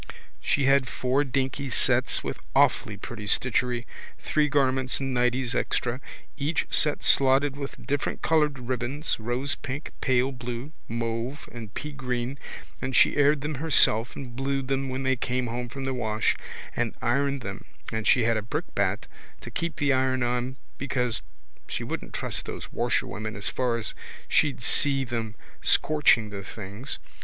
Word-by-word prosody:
She 140 - +2
had 135 -1 +4
four 130 +3 +1
dinky 135 +1 -1
sets - - +2
with - - -4 0.2
awfully - - +3
pretty 105 -3 -7
stitchery, 125 +2 +1 0.3
three 150 -1 +1
garments 130 -2 +2
and 135 -1 -2
nighties 125 0 +1
extra, 120 - 0
and 130 - -8 0.4
each 150 +3 0
set 150 -1 +3
slotted 135 +1 +4
with 140 -3 -7
different 140 +2 -1
coloured 150 -3 +3
ribbons, 130 +4 -1
rosepink, 130 +4 -3
pale 130 0 +2
blue, 125 +2 -5 0.2
mauve 115 +4 -3
and 115 -4 -8
peagreen, 135 -2 -3 0.4
and 130 -1 -2
she - - +6
aired 145 0 +4
them 150 +2 -2
herself 120 -7 +5
and 125 -3 -7
blued 135 0 -1
them 135 0 0
when 130 +1 -3
they 130 0 +2
came 125 +1 -1
home 120 +1 -3
from 135 +2 -5
the 135 - -1
wash 110 -3 +1 0.4
and - - -1
ironed 140 -1 +1
them 100 -2 -6 0.3
and 110 -1 -2
she 125 - +5
had 115 0 +3
a - - -1
brickbat 105 - -1 0.4
to - - -8
keep 170 -3 -2
the 140 -2 +2
iron 130 -1 +2
on 125 +2 -1 0.2
because 125 -3 0 0.5
she - - -3
wouldn't - - -5
trust - - -2
those - - -6
washerwomen 110 0 -1
as 100 - -1
far 125 -2 0
as 110 -2 -3 0.3
she'd 135 -5 +2
see 135 +2 +3
them 115 -3 -3 0.3
scorching 135 -8 +4
the 100 -1 -6
things. 100 +5 -6
130 Hz, 155 wpm, -27 LUFS, 120-140 Hz, 0.5 s, she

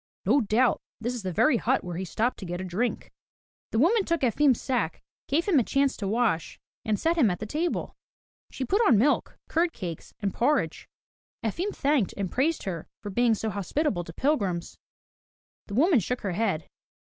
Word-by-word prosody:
"No 260 +9 +4
doubt 230 +3 +2 0.2
this 240 +2 -2
is 245 - -4
the 190 -2 -3
very 245 - +3
hut 260 +4 +1
where 175 -1 -5
he 190 +2 -3
stopped 225 +8 -1
to 195 - -6
get 175 +1 -4
a - - -4
drink." 195 +7 -2 0.6
The - - -2
woman 385 - +4
took 335 -2 -1
Efim's 265 +1 +3
sack, 245 - -2 0.2
gave 315 +5 +1
him 340 -8 +5
a - - +2
chance 275 +3 +1
to 200 - -3
wash, 215 -6 0 0.2
and 215 -3 0
set 335 +1 +1
him 240 -8 +5
at 180 - -1
the 215 - -5
table. 320 +10 -2 0.5
She 260 - -4
put 400 - +2
on 235 - +6
milk, 270 +8 +1
curd 335 +1 +1
cakes, 170 -4 -7
and 200 -3 -2
porridge. 285 +6 0 0.5
Efim 335 - -1
thanked 275 -8 +1
and 195 -3 -2
praised 310 +6 +1
her 170 -5 -4 0.2
for 205 - -5
being 235 +2 +3
so 220 +1 -3
hospitable 205 - -1
to 165 - -8
pilgrims. 195 - -1 0.9
The 200 - -5
woman 310 - +5
shook 245 +6 -3
her 200 - -2
head. 185 -4 -1
235 Hz, 195 wpm, -27 LUFS, 195-285 Hz, 0.9 s, on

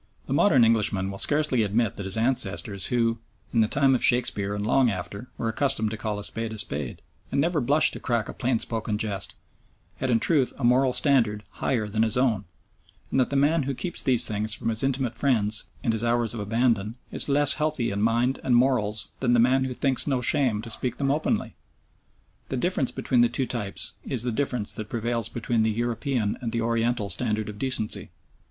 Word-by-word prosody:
The - - -3
modern 135 - +5
Englishman 105 -4 +2
will 100 - -8
scarcely 145 -5 +1
admit 105 +1 0
that 100 - -5
his 95 - 0
ancestors 105 -4 0
who, 115 -2 0 0.3
in 115 - +3
the 110 - +3
time 135 +2 +3
of 130 - +1
Shakespeare 105 -5 +2
and 105 0 -3
long 130 +2 +3
after, 100 +4 -5
were 115 - -2
accustomed 110 -2 +1
to 110 - -4
call 105 -1 -3
a 105 - -6
spade 115 +1 -2
a 110 - -6
spade, 75 -9 -2 0.3
and 140 - 0
never 160 +1 +1
blushed 145 +5 +3
to - - -5
crack 120 -3 -1
a - - -6
plain 125 -1 0
spoken 110 -2 -2
jest, 100 -4 -3 0.6
had 130 - -2
in 115 -2 +3
truth 140 -1 +1
a 140 - -7
moral 125 +2 +4
standard 115 -7 +2
higher 115 -5 -1
than 110 +1 -1
his 115 +1 +2
own, 115 -6 +1 0.7
and - - +1
that 130 - +2
the 140 - -3
man 150 +4 +3
who 135 - -2
keeps 175 +6 -3
these 125 -2 +3
things 105 0 -1
for - - -11
his 110 -1 -2
intimate 135 -3 -1
friends 110 -6 +1 0.2
and 115 - +1
his 110 0 -2
hours 120 -1 +1
of 115 - -5
abandon 110 0 0 0.2
is - - +1
less 145 0 +4
healthy 150 -7 -1
in 100 +1 -2
mind 120 +4 +1
and 125 - +2
morals 120 -4 +1
than 125 -2 +1
the 120 - +4
man 130 +3 +3
who 130 - -3
thinks 135 +1 0
no 135 -3 +1
shame 125 -5 +1
to 115 - -7
speak 125 +1 -3
them 135 -1 0
openly. 150 +2 -1 1.0
The 130 - -2
difference 140 -2 0
between 125 -3 +1
the 120 - +4
two 135 - -1
types 105 -6 -4
is 125 -4 0
the 125 - -1
difference 125 -3 -2
that 110 -1 -7
prevails 115 -1 -2
between 115 0 -1
the 110 - +2
European 120 0 -1
and 115 -2 -3
the 115 - -1
Oriental 115 -1 0
standard 105 +3 0
of 105 -1 -9
decency. 130 -4 0
115 Hz, 210 wpm, -25 LUFS, 110-130 Hz, 1.0 s, modern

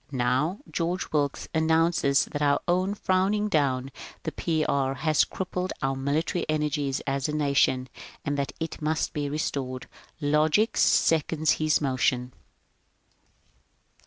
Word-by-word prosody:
Now 130 +7 0
George 175 +2 -2
Wilkes 145 -2 -1
annoances 160 -3 +3
that 145 - -3
our 175 +7 +1
frowning 200 +2 +1
down 135 -5 +1 0.3
the - - -3
P. 160 -2 -1
B. - - 0
has 140 +2 +2
crippled 185 0 -4
our 135 0 +1
military 145 +6 -1
energies 150 -3 0
as 135 0 -1
a 150 - -2
nation, 140 -3 +2 0.4
and 145 - -1
that 140 -1 -2
it 160 0 -5
must 155 +1 -1
be 145 -2 -2
restored. 135 -3 -3 0.3
Logic 155 +8 +2
seconds 160 -1 +3
his 155 -1 +2
motion. 125 -2 0
150 Hz, 125 wpm, -26 LUFS, 140-165 Hz, 0.4 s, annoances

